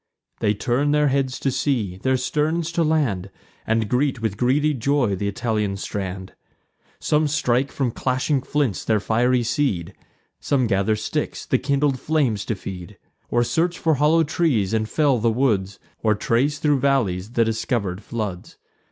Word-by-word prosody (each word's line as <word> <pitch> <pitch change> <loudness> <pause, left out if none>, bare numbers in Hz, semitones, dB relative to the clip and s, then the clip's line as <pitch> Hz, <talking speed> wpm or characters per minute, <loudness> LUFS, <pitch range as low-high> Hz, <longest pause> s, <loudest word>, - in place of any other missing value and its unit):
They 105 - +1
turn 125 +7 0
their 150 -1 +3
heads 135 -1 0
to 135 - +1
sea, 125 -8 -1
their 130 +6 +1
sterns 155 +6 -1
to 170 0 +1
land, 135 - 0 0.4
And 110 -1 +1
greet 130 +2 0
with 110 -3 -2
greedy 145 +7 +2
joy 130 -4 +1
th' 95 - -9
Italian 105 -1 -1
strand. 95 -2 -5 0.7
Some 150 0 +2
strike 135 -3 +1
from 130 -4 -1
clashing 130 +3 0
flints 135 -7 -1
their 110 -1 +2
fiery 120 +4 +2
seed; 110 - -1 0.5
Some 135 -3 +1
gather 100 0 +1
sticks, 105 0 -3
the - - +1
kindled 140 0 +1
flames 135 -10 0
to 110 - -2
feed, 90 -3 -8 0.3
Or 120 - +2
search 170 +7 0
for 160 - +2
hollow 150 +4 +3
trees, 145 - 0
and 110 -1 0
fell 140 -2 +2
the 115 +1 +2
woods, 105 -6 0 0.2
Or 110 -1 +2
trace 130 +8 +1
thro' 145 -1 +2
valleys 120 -7 0
the 115 -1 +3
discover'd 110 -4 -2
floods. 105 -5 -5
125 Hz, 160 wpm, -22 LUFS, 105-145 Hz, 0.7 s, their